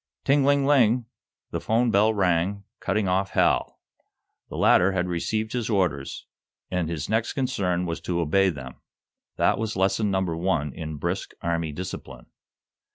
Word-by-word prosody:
Ting 140 Hz, +1 st, +3 dB
ling 140 Hz, 0 st, +3 dB
ling! 125 Hz, -4 st, +4 dB, 0.5 s
The -, -, -3 dB
'phone 115 Hz, +2 st, +2 dB
bell 110 Hz, +1 st, +4 dB
rang, 95 Hz, 0 st, +1 dB, 0.2 s
cutting 100 Hz, 0 st, 0 dB
off 95 Hz, +2 st, +1 dB
Hal. -, -, +1 dB, 0.7 s
The -, -, -7 dB
latter 95 Hz, +2 st, +4 dB
had 90 Hz, -1 st, 0 dB
received 110 Hz, +5 st, -2 dB
his 120 Hz, -3 st, -2 dB
orders, 90 Hz, -10 st, -1 dB, 0.5 s
and 90 Hz, -3 st, -1 dB
his 80 Hz, -4 st, -3 dB
next 110 Hz, +2 st, 0 dB
concern 100 Hz, -10 st, -1 dB
was 85 Hz, -1 st, -4 dB
to 85 Hz, -1 st, -2 dB
obey 95 Hz, +4 st, +3 dB
them. 65 Hz, -6 st, -7 dB, 0.6 s
That -, -, +2 dB
was 110 Hz, -1 st, -2 dB
lesson 95 Hz, +3 st, +1 dB
number 95 Hz, -4 st, 0 dB
one 80 Hz, -5 st, -1 dB
in 80 Hz, -3 st, -6 dB
brisk -, -, -3 dB
Army 85 Hz, -2 st, -1 dB
discipline. 70 Hz, -6 st, -7 dB
95 Hz, 155 wpm, -25 LUFS, 85-110 Hz, 0.7 s, ling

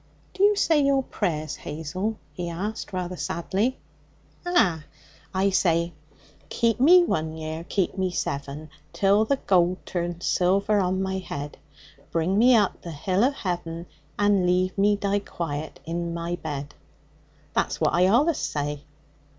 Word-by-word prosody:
'Do 380 Hz, -, -5 dB
you 415 Hz, +1 st, +6 dB
say 320 Hz, -6 st, +3 dB
your 275 Hz, -1 st, +3 dB
prayers, 155 Hz, -, -2 dB
Hazel?' 185 Hz, +8 st, -4 dB, 0.2 s
he 175 Hz, -1 st, -4 dB
asked 200 Hz, +6 st, -4 dB
rather 180 Hz, -1 st, -3 dB
sadly. 195 Hz, +9 st, -1 dB, 0.7 s
'Ah! 205 Hz, -, +2 dB, 0.5 s
I 195 Hz, +1 st, +1 dB
say: 170 Hz, -2 st, +2 dB, 0.6 s
"Keep 230 Hz, 0 st, +1 dB
me 350 Hz, +7 st, +7 dB
one 160 Hz, -, -1 dB
year, 160 Hz, +1 st, -5 dB
keep 190 Hz, 0 st, -1 dB
me 185 Hz, -1 st, +1 dB
seven, 145 Hz, -2 st, -4 dB, 0.2 s
Till 200 Hz, +2 st, +3 dB
the 280 Hz, -, +2 dB
gold 180 Hz, -6 st, +1 dB
turns 175 Hz, -1 st, -3 dB
silver 195 Hz, +3 st, +2 dB
on 190 Hz, 0 st, 0 dB
my 190 Hz, 0 st, -2 dB
head; 145 Hz, -5 st, -6 dB, 0.5 s
Bring 175 Hz, +5 st, +1 dB
me 245 Hz, +2 st, +6 dB
up 205 Hz, -4 st, +2 dB
to 170 Hz, -, -8 dB
the 160 Hz, -, -7 dB
hill 185 Hz, +7 st, +1 dB
o' 255 Hz, -, +5 dB
heaven, 175 Hz, -9 st, -4 dB, 0.3 s
And 205 Hz, -3 st, +3 dB
leave 180 Hz, +1 st, +1 dB
me 205 Hz, +1 st, +3 dB
die 200 Hz, 0 st, 0 dB
quiet 155 Hz, -6 st, -5 dB
in 170 Hz, +1 st, -3 dB
my 170 Hz, +1 st, -2 dB
bed." 145 Hz, -3 st, -6 dB, 0.8 s
That's -, -, 0 dB
what -, -, +2 dB
I 180 Hz, +2 st, +4 dB
allus 285 Hz, -, +3 dB
say.' 145 Hz, 0 st, -3 dB
185 Hz, 150 wpm, -25 LUFS, 165-205 Hz, 0.8 s, me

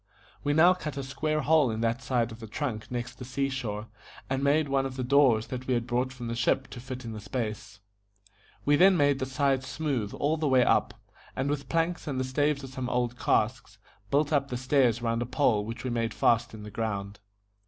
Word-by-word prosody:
We 145 Hz, -, +1 dB
now 170 Hz, +4 st, +6 dB
cut 150 Hz, -6 st, -6 dB
a 140 Hz, -, -3 dB
square 155 Hz, +3 st, -1 dB
hole 150 Hz, -3 st, +4 dB
in 110 Hz, 0 st, -3 dB
that 115 Hz, +2 st, 0 dB
side 125 Hz, -2 st, 0 dB
of 110 Hz, -, -10 dB
the 110 Hz, -, -8 dB
trunk 110 Hz, -2 st, -4 dB
next 120 Hz, 0 st, -5 dB
the -, -, -6 dB
sea 135 Hz, +2 st, -1 dB
shore, 110 Hz, -5 st, -4 dB, 0.5 s
and 135 Hz, +1 st, 0 dB
made 145 Hz, +2 st, +3 dB
one 135 Hz, -1 st, +1 dB
of 130 Hz, -, -8 dB
the 130 Hz, -, -3 dB
doors 125 Hz, -4 st, +4 dB
that 130 Hz, 0 st, -5 dB
we 130 Hz, -, +2 dB
had 120 Hz, -1 st, -1 dB
brought 125 Hz, +2 st, 0 dB
from 125 Hz, -2 st, -8 dB
the 115 Hz, -, -2 dB
ship 120 Hz, +3 st, +1 dB
to 125 Hz, -, -7 dB
fit 130 Hz, 0 st, -7 dB
in 115 Hz, -, -5 dB
the 110 Hz, -, -6 dB
space. 110 Hz, -1 st, -5 dB, 0.8 s
We 145 Hz, 0 st, +4 dB
then 190 Hz, +2 st, +6 dB
made 145 Hz, -2 st, +3 dB
the 130 Hz, -, -2 dB
sides 135 Hz, -1 st, 0 dB
smooth 135 Hz, -10 st, -2 dB
all 150 Hz, +3 st, 0 dB
the 155 Hz, -1 st, 0 dB
way 130 Hz, -2 st, +4 dB
up, -, -, +2 dB, 0.4 s
and 135 Hz, +2 st, -1 dB
with 145 Hz, -1 st, -4 dB
planks 165 Hz, 0 st, 0 dB
and 135 Hz, -3 st, -2 dB
the -, -, +1 dB
staves 145 Hz, +2 st, 0 dB
of 135 Hz, -, -8 dB
some 130 Hz, -2 st, -4 dB
old 125 Hz, -1 st, 0 dB
casks, 115 Hz, -1 st, 0 dB, 0.3 s
built 150 Hz, +2 st, +2 dB
up 140 Hz, -1 st, +2 dB
the 125 Hz, -, -3 dB
stairs 125 Hz, -2 st, +2 dB
round 115 Hz, 0 st, 0 dB
a -, -, 0 dB
pole 125 Hz, -6 st, +2 dB
which 115 Hz, +2 st, -6 dB
we 130 Hz, -, -2 dB
made 115 Hz, -1 st, -1 dB
fast 115 Hz, -1 st, +2 dB
in 105 Hz, -, -9 dB
the 105 Hz, -, -8 dB
ground. 100 Hz, -2 st, -3 dB
130 Hz, 230 wpm, -28 LUFS, 115-140 Hz, 0.8 s, now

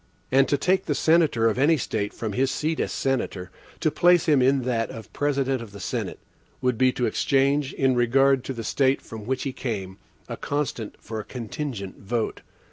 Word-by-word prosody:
And 135 Hz, 0 st, +5 dB
to 145 Hz, -, +2 dB
take 185 Hz, +6 st, +1 dB
the -, -, +1 dB
senator 160 Hz, -9 st, +3 dB
of 115 Hz, +2 st, 0 dB
any 155 Hz, +4 st, +4 dB
State 105 Hz, -5 st, -2 dB
from 110 Hz, -3 st, -4 dB
his 130 Hz, +5 st, +1 dB
seat 155 Hz, +4 st, -1 dB
as -, -, -1 dB
senator, 110 Hz, -9 st, -2 dB, 0.3 s
to 155 Hz, -, +2 dB
place 175 Hz, +3 st, +4 dB
him 150 Hz, -5 st, +4 dB
in 135 Hz, +1 st, +3 dB
that 115 Hz, -2 st, -1 dB
of 110 Hz, -2 st, -10 dB
President 135 Hz, -3 st, 0 dB
of 110 Hz, -4 st, -10 dB
the 100 Hz, -, -9 dB
Senate, 85 Hz, -, -3 dB, 0.4 s
would 125 Hz, -1 st, +1 dB
be 130 Hz, +2 st, +3 dB
to 125 Hz, -, 0 dB
exchange, 135 Hz, +4 st, +1 dB
in 135 Hz, -1 st, +2 dB
regard 130 Hz, +2 st, +3 dB
to 135 Hz, -, -3 dB
the 115 Hz, -2 st, -6 dB
State 135 Hz, +4 st, +2 dB
from 110 Hz, -1 st, -10 dB
which 130 Hz, 0 st, -1 dB
he 135 Hz, -, -3 dB
came, 100 Hz, -8 st, -4 dB, 0.3 s
a -, -, -5 dB
constant 140 Hz, -6 st, -3 dB
for 110 Hz, -1 st, -6 dB
a -, -, -4 dB
contingent 120 Hz, -, -6 dB
vote. 110 Hz, +3 st, -2 dB
130 Hz, 200 wpm, -25 LUFS, 115-140 Hz, 0.4 s, And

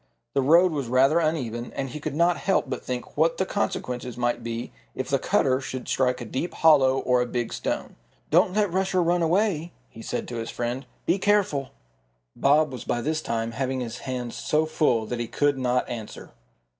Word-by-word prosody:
The 140 Hz, -, +2 dB
road 170 Hz, +6 st, +5 dB
was 140 Hz, -5 st, -3 dB
rather 135 Hz, +6 st, +4 dB
uneven, 125 Hz, -8 st, -2 dB
and 135 Hz, -1 st, -3 dB
he 150 Hz, -, -6 dB
could 145 Hz, -1 st, -4 dB
not 170 Hz, +2 st, +3 dB
help 195 Hz, -6 st, +1 dB
but 130 Hz, -, -4 dB
think 125 Hz, -1 st, -5 dB
what 165 Hz, +2 st, +2 dB
the 190 Hz, -, +1 dB
consequences 125 Hz, -, -3 dB
might 120 Hz, 0 st, 0 dB
be 115 Hz, 0 st, -4 dB, 0.2 s
if -, -, -4 dB
the -, -, +2 dB
cutter 130 Hz, 0 st, +2 dB
should 130 Hz, -1 st, -6 dB
strike 125 Hz, -1 st, +1 dB
a 120 Hz, -, -6 dB
deep 130 Hz, +10 st, -4 dB
hollow 135 Hz, -5 st, +5 dB
or 125 Hz, -1 st, +2 dB
a 125 Hz, -, -1 dB
big 120 Hz, -1 st, -3 dB
stone. -, -, -3 dB, 0.4 s
"Don't 185 Hz, -, +4 dB
let 205 Hz, -4 st, +1 dB
Rusher 190 Hz, -1 st, +1 dB
run 175 Hz, +1 st, +2 dB
away," 170 Hz, -1 st, +1 dB, 0.2 s
he 115 Hz, -, -11 dB
said -, -, -4 dB
to 120 Hz, -, -5 dB
his 115 Hz, 0 st, -4 dB
friend. 120 Hz, +3 st, -3 dB, 0.2 s
"Be 195 Hz, -, +2 dB
careful." 185 Hz, -10 st, +1 dB, 0.7 s
Bob 150 Hz, +1 st, +3 dB
was 130 Hz, -, -6 dB
by 120 Hz, -, -1 dB
this 155 Hz, +4 st, -1 dB
time 115 Hz, -3 st, -2 dB
having 130 Hz, +2 st, -2 dB
his 120 Hz, -1 st, -5 dB
hands 125 Hz, -3 st, -4 dB
so 155 Hz, +1 st, +1 dB
full 145 Hz, -8 st, +1 dB
that 120 Hz, +2 st, -4 dB
he 120 Hz, -, -2 dB
could 145 Hz, +1 st, +1 dB
not 125 Hz, 0 st, +1 dB
answer. 115 Hz, -3 st, -7 dB
135 Hz, 200 wpm, -25 LUFS, 125-160 Hz, 0.7 s, road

